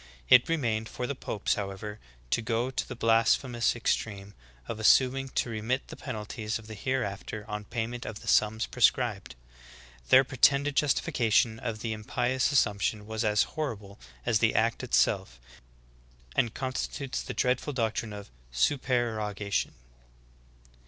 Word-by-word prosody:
It 125 - +7
remained 115 -9 0
for 125 - -4
the 140 - -2
popes, 110 -6 -2
however, 105 +1 -5 0.3
to - - +2
go 115 +2 -1
to - - -3
the 125 - -6
blasphemous 115 +1 +2
extreme 100 -3 -2 0.3
of 110 - -5
assuming 130 +4 +4
to 120 - 0
remit 115 +5 -2
the - - -7
penalties 110 -3 -4
of 110 - -13
the 110 - -8
hereafter 105 -2 -3
on 105 0 -5
pay 115 0 -2
ment 120 +1 -7
of 105 -1 -7
the - - -12
sums 110 +2 +3
prescribed. 115 - +1 0.7
Their 130 - +8
pretended 140 +2 +3
justifica 135 -5 +1
tion 110 0 +3
of 115 -3 -4
the 115 -1 -2
impious 125 +5 0
assumption 105 -5 +1
was 110 +1 -3
as 105 -1 +3
horrible 105 -10 -5 0.3
as - - +2
the - - +2
act - - +1
it 65 - -1
self, 60 0 +1 1.0
and 115 -2 +1
constitutes 130 +1 -3
the - - -6
dreadful 125 +3 0
doctrine 115 -3 -2
of 100 -5 -9 0.2
supereroga 110 - 0
tion. - - 0
115 Hz, 150 wpm, -29 LUFS, 105-125 Hz, 1.0 s, Their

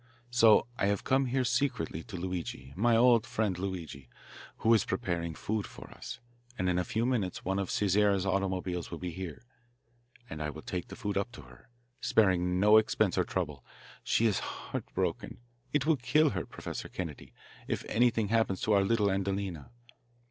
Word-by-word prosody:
So 115 -3 +6
I 100 - +2
have 100 0 0
come 135 0 +2
here 130 +1 +1
secretly 120 - 0
to 110 -5 -8
Luigi, 85 -7 -5
my 115 +5 +3
old 120 -1 +5
friend 105 -4 0
Luigi, 85 -9 -5 0.5
who 115 - +4
is 110 - +4
preparing 85 -3 -2
food 105 +4 -2
for - - -12
us, - - -8 0.4
and 90 - 0
in 90 0 +2
a - - +1
few 110 +6 -1
minutes 110 -8 -1
one 95 +1 0
of 95 - -2
Cesare's 100 -1 +2
automobiles 95 -2 -1
will 85 - -5
be 90 +1 -4
here, 85 -1 -7 0.8
and 80 -9 -7
I 75 - -1
will 80 +1 -9
take 90 -2 -4
the - - -9
food 100 -1 -1
up 105 +5 -3
to - - -10
her - - -17 0.3
sparing 90 -6 +2
no 105 +2 +7
expense 110 -2 +2
or 90 - +3
trouble. 75 -8 -3 0.4
She 115 - +2
is 105 -4 +2
heart - - -6
broken. - - -2 0.3
It 145 -1 +1
will 160 -1 +3
kill 150 +5 +3
her, 90 -3 -3
Professor - - -6
Kennedy, 75 -7 -6 0.4
if - - -2
anything 115 -3 +2
happens 110 -4 +1
to 110 - +2
our 100 -1 +5
little 105 -1 +2
Adelina. 95 -3 -2
100 Hz, 180 wpm, -31 LUFS, 90-115 Hz, 0.8 s, no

